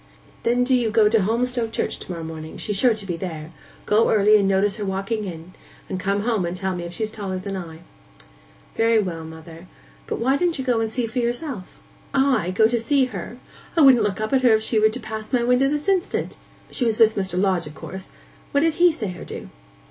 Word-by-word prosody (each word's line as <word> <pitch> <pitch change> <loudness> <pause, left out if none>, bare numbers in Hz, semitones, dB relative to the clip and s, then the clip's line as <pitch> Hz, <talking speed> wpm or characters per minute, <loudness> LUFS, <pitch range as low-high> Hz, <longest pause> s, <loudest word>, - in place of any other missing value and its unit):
'Then 245 +1 +2
do 260 +1 +1
you 240 -3 +2
go 215 0 +4
to 220 0 +3
Holmstoke 235 +3 0
church - - -2
to - - -8
morrow 165 -2 -5
morning: 160 -1 -7
she's 210 - -3
sure 235 +3 +4
to 210 -2 -6
be 175 -3 -3
there. 165 -3 -6 0.3
Go 215 +2 +3
early 210 0 +5
and 195 - +2
notice 195 +1 +2
her 210 - -4
walking 195 +3 -2
in, 170 -1 -8 0.3
and 185 - -4
come 200 +2 0
home 225 -4 0
and 170 +1 -3
tell 190 0 -2
me 175 -1 -5
if 170 - -7
she's 215 +4 -3
taller 195 -4 -4
than 195 +1 -5
I.' 165 -3 -7 0.9
'Very 225 0 +3
well, 175 -5 -3
mother. 160 +2 -11 0.4
But - - -2
why 265 +4 +2
don't 345 -1 0
you 265 - -4
go 245 -3 +2
and 225 -1 -1
see 240 +2 -1
for 230 +3 -3
yourself?' 240 - -3 0.4
'I 265 -9 +2
go 220 - +5
to 235 +1 0
see 270 +3 +2
her! - - -6 0.4
I - - +6
wouldn't 265 -5 +7
look 205 -1 -1
up 215 +4 -2
at 265 - +4
her 245 -3 +5
if 220 0 +2
she 220 0 +1
were 215 0 +5
to 250 - -5
pass 220 -1 -7
my 245 -3 +2
window 250 +3 +3
this 295 +4 -2
instant. 380 -2 0 0.4
She - - -1
was 225 -2 +1
with 225 -1 +5
Mr. 190 -2 -1
Lodge, 185 -4 +1
of 150 - -11
course. 190 0 -8 0.4
What 285 - +3
did 325 0 +2
he 355 -1 +7
say 215 - -4
or - - -9
do? - - -8
215 Hz, 235 wpm, -23 LUFS, 185-245 Hz, 0.9 s, wouldn't